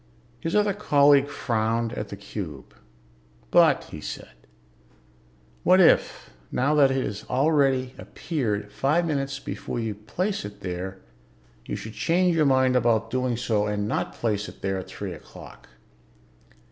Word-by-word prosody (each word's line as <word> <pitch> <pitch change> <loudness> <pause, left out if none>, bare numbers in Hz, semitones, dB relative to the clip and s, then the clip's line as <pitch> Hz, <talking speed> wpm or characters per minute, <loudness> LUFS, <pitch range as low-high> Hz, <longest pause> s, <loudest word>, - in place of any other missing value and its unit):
His 165 +7 -3
other 210 -1 +3
colleague 145 -7 +4
frowned 115 -2 -1
at 105 - -5
the - - -6
cube. 95 -8 -8 0.8
"But," - - +5
he - - -7
said, - - -7 1.3
"what 185 +1 +5
if, 175 - +3 0.2
now 140 +4 +1
that 145 -3 +5
it 135 -1 0
has 100 0 -5
already 135 -2 +2
appeared 105 -11 -3
five 150 +10 +1
minutes 135 -3 -2
before 135 - -5
you 110 -2 -2
place 180 - -3
it 100 0 -9
there, 90 +1 -5 0.7
you - - -3
should 110 - -7
change 175 +4 +2
your 155 -3 +3
mind 130 -1 +3
about 115 -2 +2
doing 125 -2 0
so 110 -3 0
and 105 0 -1
not - - -2
place 105 -3 -1
it - - -16
there 95 -1 -1
at 90 - -8
three 100 -3 -6
o'clock? 80 - -13
125 Hz, 145 wpm, -25 LUFS, 105-145 Hz, 1.3 s, But